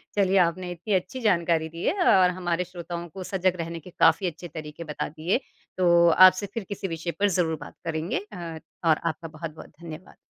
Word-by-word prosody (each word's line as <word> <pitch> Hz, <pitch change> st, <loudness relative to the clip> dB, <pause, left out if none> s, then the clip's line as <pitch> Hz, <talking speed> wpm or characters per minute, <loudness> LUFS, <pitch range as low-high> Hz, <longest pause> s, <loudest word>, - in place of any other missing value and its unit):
चलिए 195 Hz, -1 st, +3 dB
आपने 180 Hz, +1 st, -4 dB
इत्ती 180 Hz, +4 st, -3 dB
अच्छी 245 Hz, +8 st, -1 dB
जानकारी 170 Hz, -6 st, +2 dB
दी 165 Hz, +2 st, -8 dB
है -, -, +3 dB, 0.2 s
और 180 Hz, -1 st, +5 dB
हमारे 175 Hz, -1 st, -1 dB
श्रोताओं 175 Hz, -1 st, -7 dB
को 190 Hz, -, -6 dB
सजग 185 Hz, -1 st, 0 dB
रहने 165 Hz, 0 st, -5 dB
के 170 Hz, -, -13 dB
काफ़ी 180 Hz, +3 st, +5 dB
अच्छे 175 Hz, +1 st, -6 dB
तरीके 155 Hz, 0 st, -8 dB
बता -, -, -3 dB
दिए। 165 Hz, -, -1 dB, 0.4 s
तो 180 Hz, -2 st, +3 dB, 0.4 s
आपसे 185 Hz, +2 st, +1 dB
फिर 230 Hz, -, -3 dB
किसी 200 Hz, -1 st, -4 dB
विषय 165 Hz, 0 st, -4 dB
पर 205 Hz, 0 st, +3 dB
ज़रूर 160 Hz, -3 st, +1 dB
बात -, -, -10 dB
करेंगे 160 Hz, +1 st, -1 dB
अ, 165 Hz, -3 st, -6 dB, 0.2 s
और 160 Hz, -2 st, +4 dB
आपका 165 Hz, 0 st, -2 dB
बहुत-बहुत 155 Hz, 0 st, -8 dB
धन्यवाद। 165 Hz, +1 st, -10 dB
170 Hz, 190 wpm, -26 LUFS, 165-185 Hz, 0.4 s, और